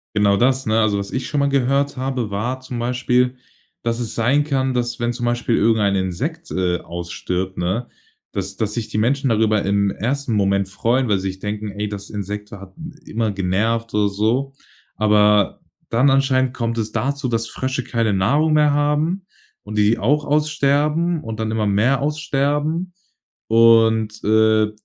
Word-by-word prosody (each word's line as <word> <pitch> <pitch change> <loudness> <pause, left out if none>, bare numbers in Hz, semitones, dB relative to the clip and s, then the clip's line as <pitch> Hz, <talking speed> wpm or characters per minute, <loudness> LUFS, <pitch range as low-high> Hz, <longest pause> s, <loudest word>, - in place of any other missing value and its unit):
Genau 105 -1 +4
das, 130 +5 +2
ne? 110 +1 +2
Also, 105 -2 +2
was 100 0 -5
ich 130 - -3
schon 145 - -1
mal 140 - +2
gehört 140 +1 +1
habe, 130 -4 -2
war 120 +6 -2
zum 130 -2 -6
Beispiel, 125 +1 +1 0.4
dass 115 0 -2
es 115 - -4
sein 130 +6 +2
kann, 135 -3 0
dass, 120 -1 -2
wenn 120 0 0
zum 120 0 -4
Beispiel 120 -1 0
irgendein 105 -2 +2
Insekt, 135 - -3
äh, 90 -1 0
ausstirbt, 90 +2 -4
ne, 95 +8 -1 0.5
dass 100 -1 -3
dass 110 -2 -1
sich 115 -1 -3
die - - -3
Menschen 135 +5 +1
darüber 110 -2 +2
im 100 0 +1
1. 130 +5 -2
Moment 100 -1 +1
freuen, 120 +6 0
weil 105 -3 +2
sie 95 0 -3
sich 95 0 -8
denken: 105 +1 -4
„Ey, 105 +1 -4
das 100 -1 -7
Insekt 105 0 -5
hat 95 -2 -11 0.3
immer 110 -1 -1
genervt“, 105 +5 -1
oder 105 -1 +2
so. 115 +7 0 0.4
Aber 105 -1 +3 0.3
dann 125 +5 +3
anscheinend 130 -1 +2
kommt 115 -2 -2
es 110 -1 -2
dazu, 135 +4 -2
dass 115 -1 -1
Frösche 130 +3 -3
keine 115 -3 0
Nahrung 140 +12 +2
mehr 150 -1 +4
haben 150 +6 0 0.4
und 105 +1 -6
die 105 +2 +3
auch 145 +8 +1
aussterben 150 +2 +1
und 115 -3 -6
dann 110 0 -2
immer 110 -1 0
mehr 110 +8 +2
aussterben. 150 +4 -1 0.5
Und, 110 -1 +4
äh, 110 0 +3
115 Hz, 170 wpm, -20 LUFS, 105-135 Hz, 0.5 s, Genau